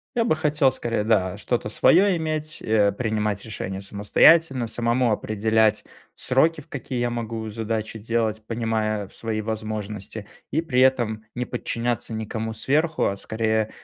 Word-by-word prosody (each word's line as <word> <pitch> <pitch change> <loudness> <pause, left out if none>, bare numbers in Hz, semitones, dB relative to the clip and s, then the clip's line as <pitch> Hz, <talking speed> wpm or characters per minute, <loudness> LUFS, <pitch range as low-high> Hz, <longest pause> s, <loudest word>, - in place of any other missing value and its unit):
Я 230 -1 +2
бы 195 - +2
хотел 150 -3 +2
скорее, 115 -3 -2
да, 100 -4 +1
что-то 110 +1 -2
своё 185 - +4
иметь, 155 -1 -3
э, 105 -2 +3
принимать 105 -2 -2
решения 95 -3 -5
самостоятельно, 120 +7 +4
самому 120 +1 +1
определять 110 0 +1 0.3
сроки, 155 +5 +2
в 135 - -17
какие 130 -2 -5
я 120 0 0
могу 115 -1 -4
задачи 110 0 -3
делать, 110 0 -1
понимая 110 -3 -1
в - - -17
свои 110 -1 -3
возможности 110 -1 -5 0.2
и, 160 +3 0
при 130 -6 +1
этом, 120 -4 +2
не 125 - -2
подчиняться 120 -2 -3
никому 110 +1 -4
сверху, 155 +7 +1
а 100 - 0
скорее, 110 +1 -1
115 Hz, 145 wpm, -24 LUFS, 110-125 Hz, 0.3 s, своё